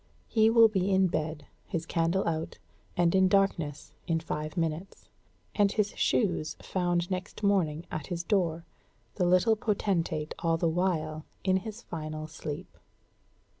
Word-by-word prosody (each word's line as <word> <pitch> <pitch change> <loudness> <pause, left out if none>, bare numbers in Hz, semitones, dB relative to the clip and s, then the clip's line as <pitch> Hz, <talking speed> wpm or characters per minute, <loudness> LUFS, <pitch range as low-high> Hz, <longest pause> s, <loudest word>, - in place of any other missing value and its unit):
He 220 -1 +4
will 230 0 +7
be 195 -3 0
in 190 -1 +4
bed, 155 -1 -3 0.2
his 165 -1 -3
candle 165 +3 +1
out, 160 -1 -2 0.4
and 175 -1 +3
in 190 0 +5
darkness, 185 -7 0
in 165 -2 +1
five 155 -1 -4
minutes, 165 +3 -3 0.4
and 205 -2 +3
his 210 -1 +1
shoes 175 -8 +1
found 175 -1 -1
next 185 +3 -4
morning 175 -6 +2
at 155 -2 -4
his 170 -1 -3
door, 170 -4 0 0.5
the 180 - +2
little 185 +5 +4
potentate 180 -8 -1
all 165 -1 +1
the 170 - +1
while 160 -3 0 0.2
in 190 -1 +3
his 220 +4 -7
final 155 -1 -5
sleep. 155 +2 -7
175 Hz, 145 wpm, -29 LUFS, 160-195 Hz, 0.5 s, will